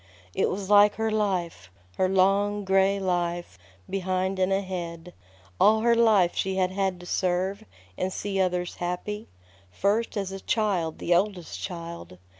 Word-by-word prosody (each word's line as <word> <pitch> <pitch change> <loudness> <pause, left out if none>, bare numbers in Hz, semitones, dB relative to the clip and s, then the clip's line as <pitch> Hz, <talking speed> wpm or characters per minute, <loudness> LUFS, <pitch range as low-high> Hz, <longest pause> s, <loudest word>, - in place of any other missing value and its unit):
It - - +1
was 195 0 -4
like 205 0 +6
her 220 0 -1
life, 180 - -1 0.3
her 185 - +2
long, 200 +2 +2
gray 195 +1 +3
life, 175 - -2 0.3
behind 190 0 -1
and 185 +1 +2
ahead. 180 -3 -3 0.5
All 220 +2 +5
her 235 +1 +4
life 215 -7 +4
she 190 0 -1
had 185 -1 +1
had 190 -2 -1
to - - -11
serve, 185 +2 -1 0.4
and 185 - -1
see 195 0 -3
others 180 -1 -1
happy. 180 +5 -4 0.4
First 205 - 0
as 195 -2 -2
a 195 - -6
child, 190 -8 0
the 175 - +1
oldest 180 -1 -1
child. 170 - -7
190 Hz, 150 wpm, -26 LUFS, 180-200 Hz, 0.5 s, like